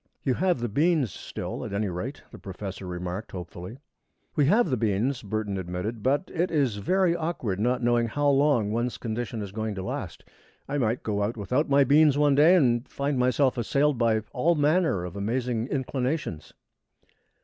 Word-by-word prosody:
"You 130 Hz, -, +1 dB
have 180 Hz, -3 st, +1 dB
the 120 Hz, -, 0 dB
beans 145 Hz, -, +1 dB
still, -, -, -6 dB
at -, -, -6 dB
any 100 Hz, +1 st, 0 dB
rate," 100 Hz, +10 st, -5 dB
the -, -, -11 dB
professor 95 Hz, 0 st, -7 dB
remarked, 90 Hz, +4 st, -5 dB
hopefully. 90 Hz, +4 st, -8 dB, 0.6 s
"We 145 Hz, -2 st, +3 dB
have 210 Hz, -, +3 dB
the -, -, +3 dB
beans," 115 Hz, +4 st, 0 dB
Burton 105 Hz, -2 st, -3 dB
admitted, 95 Hz, +5 st, -4 dB
"but 140 Hz, -, 0 dB
it 175 Hz, +1 st, 0 dB
is 135 Hz, -9 st, +1 dB
very 180 Hz, -, +2 dB
awkward 155 Hz, -, -2 dB
not 125 Hz, +3 st, 0 dB
knowing 120 Hz, -1 st, +2 dB
how 145 Hz, +5 st, 0 dB
long 135 Hz, -7 st, +3 dB
one's 120 Hz, +2 st, -1 dB
condition 115 Hz, -1 st, -4 dB
is 100 Hz, -, -7 dB
going 110 Hz, 0 st, -3 dB
to 95 Hz, -, -5 dB
last. -, -, -5 dB, 0.4 s
I 145 Hz, +1 st, -1 dB
might 115 Hz, -1 st, 0 dB
go 105 Hz, -2 st, -1 dB
out 110 Hz, +3 st, -1 dB
without 125 Hz, +9 st, 0 dB
my 140 Hz, 0 st, +5 dB
beans 145 Hz, +1 st, +5 dB
one 145 Hz, -1 st, +4 dB
day, 155 Hz, +6 st, +6 dB
and 120 Hz, -7 st, +2 dB
find 140 Hz, -1 st, -2 dB
myself 125 Hz, +1 st, +2 dB
assailed 140 Hz, +3 st, +1 dB
by 115 Hz, -2 st, +2 dB
all 165 Hz, +7 st, +2 dB
manner 150 Hz, -, +2 dB
of 90 Hz, -, -7 dB
amazing 115 Hz, +3 st, -1 dB
inclinations." 130 Hz, -, -3 dB
120 Hz, 180 wpm, -26 LUFS, 105-145 Hz, 0.6 s, day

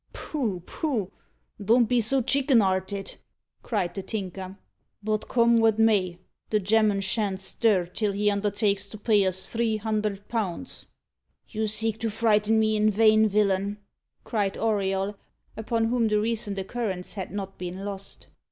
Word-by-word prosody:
"Poh! 220 Hz, -, -3 dB
poh! 230 Hz, -, -2 dB, 0.5 s
don't 235 Hz, +4 st, +4 dB
be 245 Hz, 0 st, +2 dB
so 260 Hz, +4 st, +1 dB
chicken 270 Hz, -1 st, +3 dB
'arted!" 195 Hz, 0 st, -1 dB, 0.4 s
cried 185 Hz, -7 st, -2 dB
the 195 Hz, -, -4 dB
Tinker. 190 Hz, -2 st, -6 dB, 0.5 s
"But 215 Hz, 0 st, -1 dB
come 235 Hz, -1 st, +4 dB
what 225 Hz, -1 st, +3 dB
may, 200 Hz, -6 st, +2 dB, 0.3 s
the 215 Hz, -, +2 dB
gemman 210 Hz, 0 st, +2 dB
shan't 195 Hz, 0 st, 0 dB
stir 195 Hz, -1 st, +1 dB
till 200 Hz, +4 st, -1 dB
he 205 Hz, +1 st, +1 dB
undertakes 200 Hz, 0 st, 0 dB
to 215 Hz, -, -9 dB
pay 210 Hz, -1 st, +3 dB
us 185 Hz, 0 st, -1 dB
three 225 Hz, -1 st, 0 dB
hundred 210 Hz, -2 st, -2 dB
pounds." 225 Hz, +2 st, -4 dB, 0.6 s
"You 220 Hz, -1 st, -2 dB
seek 220 Hz, +1 st, -1 dB
to 225 Hz, -1 st, -1 dB
frighten 220 Hz, 0 st, +2 dB
me 215 Hz, 0 st, +2 dB
in 215 Hz, 0 st, +3 dB
vain, 215 Hz, +1 st, +5 dB
villain," 200 Hz, 0 st, +1 dB, 0.5 s
cried 205 Hz, -4 st, -1 dB
Auriol, 200 Hz, -2 st, -1 dB, 0.4 s
upon 225 Hz, +1 st, -1 dB
whom 235 Hz, 0 st, +1 dB
the 210 Hz, -1 st, +2 dB
recent 215 Hz, -2 st, -1 dB
occurrence 195 Hz, -2 st, -3 dB
had 190 Hz, -3 st, -5 dB
not 195 Hz, -1 st, -6 dB
been 185 Hz, +2 st, -5 dB
lost. 195 Hz, -1 st, -7 dB
210 Hz, 150 wpm, -26 LUFS, 195-225 Hz, 0.6 s, vain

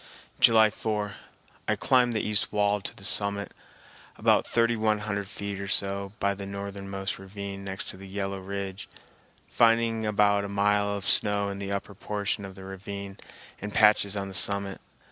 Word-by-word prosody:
July 110 Hz, -2 st, +6 dB
4. 105 Hz, -1 st, -3 dB, 0.5 s
I -, -, +2 dB
climbed 125 Hz, -2 st, +3 dB
the 110 Hz, -, -1 dB
east 105 Hz, -1 st, 0 dB
wall 105 Hz, -1 st, +1 dB
to -, -, -6 dB
the 100 Hz, -, -13 dB
summit, 100 Hz, -1 st, +3 dB, 0.7 s
about -, -, +3 dB
thirty 115 Hz, 0 st, +2 dB
one 110 Hz, -1 st, +1 dB
hundred 100 Hz, -1 st, -3 dB
feet 100 Hz, 0 st, -6 dB
or 100 Hz, -, -5 dB
so, 100 Hz, 0 st, +2 dB
by 100 Hz, 0 st, +1 dB
the 100 Hz, 0 st, -7 dB
northernmost 100 Hz, -1 st, -5 dB
ravine 100 Hz, 0 st, -7 dB
next 95 Hz, 0 st, -5 dB
to -, -, -8 dB
the 95 Hz, +1 st, -11 dB
yellow 100 Hz, 0 st, -4 dB
ridge, 95 Hz, 0 st, -6 dB, 0.6 s
finding 115 Hz, -1 st, +3 dB
about 100 Hz, -1 st, +3 dB
a 100 Hz, -, -5 dB
mile 100 Hz, 0 st, +2 dB
of 100 Hz, -1 st, -4 dB
snow 100 Hz, -1 st, +4 dB
in 100 Hz, 0 st, -5 dB
the 100 Hz, 0 st, -4 dB
upper 100 Hz, 0 st, -4 dB
portion 100 Hz, 0 st, -3 dB
of 95 Hz, -1 st, -10 dB
the 95 Hz, -, -11 dB
ravine 100 Hz, +1 st, -7 dB, 0.4 s
and 105 Hz, +1 st, -5 dB
patches 105 Hz, -2 st, +4 dB
on 100 Hz, 0 st, -3 dB
the 95 Hz, -, -8 dB
summit. 100 Hz, 0 st, +1 dB
100 Hz, 175 wpm, -27 LUFS, 100-105 Hz, 0.7 s, July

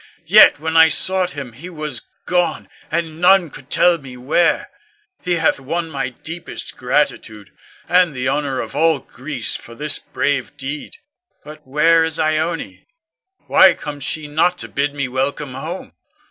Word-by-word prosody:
Yet -, -, +7 dB
when 160 Hz, +1 st, -3 dB
I 160 Hz, 0 st, +8 dB
sought 185 Hz, +1 st, +2 dB
him, 130 Hz, -4 st, -6 dB
he 155 Hz, +10 st, -10 dB
was 150 Hz, -7 st, -5 dB, 0.2 s
gone, 180 Hz, -1 st, 0 dB, 0.2 s
and 165 Hz, 0 st, -3 dB
none 180 Hz, -3 st, +5 dB
could 135 Hz, 0 st, -13 dB
tell 175 Hz, +2 st, +3 dB
me 130 Hz, -3 st, -11 dB
where. 155 Hz, +7 st, +1 dB, 0.5 s
He 180 Hz, -, -1 dB
hath 165 Hz, -4 st, +1 dB
won 165 Hz, +5 st, -3 dB
my 135 Hz, -2 st, -2 dB
deepest 160 Hz, +2 st, -7 dB
gratitude, 125 Hz, -6 st, -1 dB, 0.4 s
and 180 Hz, -5 st, +3 dB
the 130 Hz, 0 st, -2 dB
honor 140 Hz, -1 st, -1 dB
of 115 Hz, -, -8 dB
all 160 Hz, +1 st, +3 dB
Greece 130 Hz, -1 st, -4 dB
for 115 Hz, -, -10 dB
this 150 Hz, +3 st, 0 dB
brave 140 Hz, -3 st, -2 dB
deed. 140 Hz, +2 st, -6 dB, 0.5 s
But 150 Hz, -1 st, -13 dB
where 165 Hz, +4 st, +4 dB
is 160 Hz, -1 st, -1 dB
Ione? 155 Hz, -, -2 dB, 0.6 s
Why -, -, +6 dB
comes 145 Hz, -2 st, -7 dB
she 155 Hz, +2 st, -2 dB
not 165 Hz, +4 st, +1 dB
to -, -, -4 dB
bid 140 Hz, +1 st, -2 dB
me 140 Hz, -2 st, -2 dB
welcome 135 Hz, +2 st, -3 dB
home? 170 Hz, +7 st, -7 dB
150 Hz, 160 wpm, -19 LUFS, 135-165 Hz, 0.6 s, I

